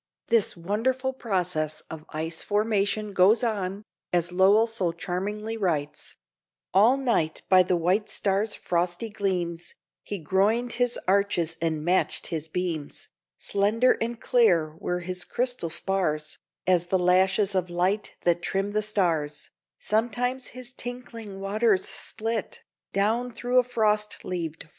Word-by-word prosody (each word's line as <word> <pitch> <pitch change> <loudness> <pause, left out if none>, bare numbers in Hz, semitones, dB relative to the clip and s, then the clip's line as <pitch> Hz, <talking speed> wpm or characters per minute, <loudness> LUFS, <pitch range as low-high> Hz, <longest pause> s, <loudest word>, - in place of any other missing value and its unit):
This 225 -5 +3
wonderful 255 +9 -1
process 180 - -2
of 160 -1 -10
ice 160 +1 -3
formation 210 0 0
goes 195 +6 +5
on, 200 -3 -2 0.3
as 175 0 +1
Lowell 195 +5 +5
so 210 -7 -1
charmingly 205 +6 -4
writes: 155 -8 -2 0.6
"All 220 +8 +6
night 230 -12 0
by 185 -1 +7
the 180 0 +1
white 185 +6 +1
stars' 205 +2 +1
frosty 175 +5 -1
gleams 180 -5 -2 0.3
He 205 - -5
groined 200 +8 +1
his 245 0 0
arches 185 -4 +1
and 160 -2 -1
matched 180 +2 +1
his 160 -1 -3
beams; 165 -3 -4 0.3
Slender 215 +5 +2
and 230 0 -2
clear 170 -13 +3
were 180 +1 -2
his 180 +1 -4
crystal 245 -4 -1
spars 160 -3 -1 0.3
As 180 -2 +2
the 190 - +2
lashes 190 +3 +3
of 185 -2 0
light 185 +4 0
that 175 0 +2
trim 195 +3 -1
the 215 +1 +1
stars; 165 -8 -1 0.3
Sometimes 245 +4 -1
his 255 0 -8
tinkling 235 -5 -7
waters 200 0 +1
slipt 225 -1 -3 0.3
Down 225 +5 +1
through 245 +2 +2
a - - +4
frost 215 -3 0
leaved 180 -1 -2
forest 165 -1 -5
crypt." - - -12
195 Hz, 140 wpm, -26 LUFS, 175-225 Hz, 0.6 s, by